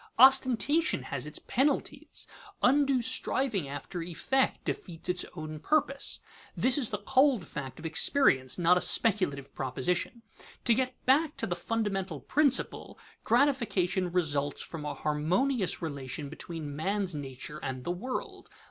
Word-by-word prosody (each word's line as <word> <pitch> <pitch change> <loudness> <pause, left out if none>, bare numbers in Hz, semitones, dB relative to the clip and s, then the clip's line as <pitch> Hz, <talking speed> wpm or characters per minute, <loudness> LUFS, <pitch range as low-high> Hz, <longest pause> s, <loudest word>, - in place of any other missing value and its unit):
Ostentation 265 +4 +5
has - - -3
its - - -5
penalties. 285 +2 -1 0.4
Undue 270 -1 +3
striving 255 - +1
after 145 +5 -6
effect 180 +11 0
defeats 170 -2 -5
its 180 0 +1
own 155 -2 -6
purpose. 280 - 0 0.4
This 255 -1 +4
is 245 - 0
the 210 - -2
cold 250 - +2
fact 135 -3 -6
of 160 - -10
experience, 160 - +3
not 180 0 +4
a - - -7
speculative 145 -11 +2
proposition. 175 - -2 0.4
To 235 - +5
get 255 +1 -1
back 295 +4 +3
to - - 0
the 175 - -2
fundamental 195 -4 -2
principle: 275 - +1 0.3
gratification 225 -9 +1
results 145 -5 0
from 155 -3 -7
a 150 - -3
harmonious 180 - 0
relation 140 -2 -5
between 160 -2 -7
man's 190 +3 -1
nature 145 +1 -7
and 130 -2 -4
the 175 - -2
world. 260 - -5
185 Hz, 135 wpm, -29 LUFS, -, 0.4 s, Ostentation